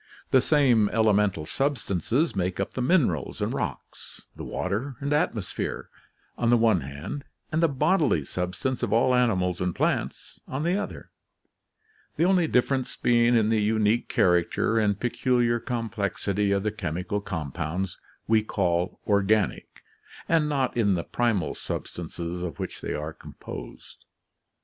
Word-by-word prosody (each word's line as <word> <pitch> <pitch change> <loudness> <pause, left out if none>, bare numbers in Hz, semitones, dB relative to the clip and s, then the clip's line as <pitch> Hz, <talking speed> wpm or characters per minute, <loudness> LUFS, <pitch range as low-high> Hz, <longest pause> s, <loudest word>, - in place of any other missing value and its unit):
The 130 - +6
same 125 -8 +4
elemental 105 -7 +2
substances 135 - 0
make 90 -1 -1
up 100 - -2
the 130 - -3
minerals 125 - +1
and - - -1
rocks, - - -6
the - - -8
water 125 +7 -3
and 140 +1 -1
atmosphere, 120 - -2 0.5
on 120 - +2
the 120 - +6
one 110 -6 +3
hand, 70 - -6 0.3
and 160 +1 +1
the 165 - +5
bodily 150 - +2
substance 90 - -3
of - - -1
all 115 +3 +4
animals 95 -8 +1
and 90 -1 -1
plants - - -2
on 135 +3 -3
the 175 +3 +1
other, 205 0 -5 1.0
the 160 - +1
only 180 -3 +3
difference 130 -1 +1
being 120 0 +3
in 110 -2 +3
the 110 -1 +2
unique 110 +2 +1
character 90 +5 +2
and 105 -2 +1
peculiar 120 -1 +1
com 115 -1 -3
plexity 100 -1 -1
of 100 -1 +1
the 105 - 0
chemical 90 0 -3
compounds 85 +1 -4 0.3
we 110 0 +4
call 90 -4 -1
organic, 100 -1 +1 0.4
and 160 -2 +2
not 135 -3 0
in 100 -5 +3
the 85 - -2
primal 115 -8 0
substances 85 +1 -5
of 90 -3 -4
which - - -6
they - - -3
are 75 +1 -4
composed. - - -10
110 Hz, 145 wpm, -26 LUFS, 90-130 Hz, 1.0 s, The